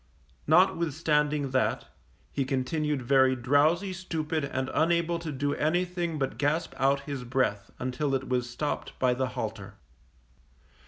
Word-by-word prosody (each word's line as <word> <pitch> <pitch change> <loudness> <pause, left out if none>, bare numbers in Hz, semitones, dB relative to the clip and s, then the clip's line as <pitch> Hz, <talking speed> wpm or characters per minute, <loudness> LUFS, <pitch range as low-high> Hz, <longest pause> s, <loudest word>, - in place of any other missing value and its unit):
Notwithstanding 150 -3 +2
that, 130 0 +1 0.5
he 140 - 0
continued 140 +2 -1
very 130 +1 +4
drowsy, 150 +9 +2
stupid 160 -4 -3
and 130 -1 -2
unable 170 +1 +2
to 165 -2 -5
do 145 +1 -1
anything 175 +1 0
but 135 -2 -2
gasp 150 +3 0
out 135 +1 +2
his 140 -2 -5
breath 120 -6 -1
until 135 +2 -1
it 135 0 -3
was 125 -1 -1
stopped 145 +5 -4
by 125 -1 +2
the 130 +1 -1
halter. 105 -2 -5
140 Hz, 130 wpm, -28 LUFS, 130-160 Hz, 0.5 s, very